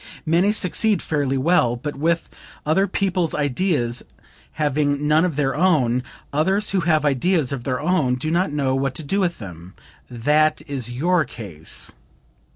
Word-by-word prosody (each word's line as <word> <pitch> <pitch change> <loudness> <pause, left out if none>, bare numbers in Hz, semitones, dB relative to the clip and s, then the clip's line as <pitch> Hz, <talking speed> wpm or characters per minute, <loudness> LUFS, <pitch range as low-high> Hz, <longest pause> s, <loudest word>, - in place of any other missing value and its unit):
Many 170 +5 +3
succeed 210 0 +2
fairly 140 -4 -1
well, 130 -4 +2
but 145 +5 -5
with 165 +4 0 0.4
other 190 +6 +2
people's 185 -3 -1
ideas, 145 -4 0 0.5
having 145 -1 0
none 155 +2 +4
of 180 -5 -1
their 135 -2 0
own; 145 -8 +2 0.3
others 190 +8 +1
who 195 - +1
have 155 -4 +1
ideas 145 +1 +1
of 135 -4 -5
their 130 -2 -1
own, 155 -7 +1
do 155 +5 -3
not 175 -1 +1
know 140 -3 0
what 135 0 -1
to 155 - -5
do 195 +8 -1
with 180 -3 0
them. 90 -2 -10 0.3
That 150 +6 +1
is 135 -6 -4
your 165 +8 +1
case." 90 - -2
150 Hz, 160 wpm, -22 LUFS, 130-175 Hz, 0.5 s, none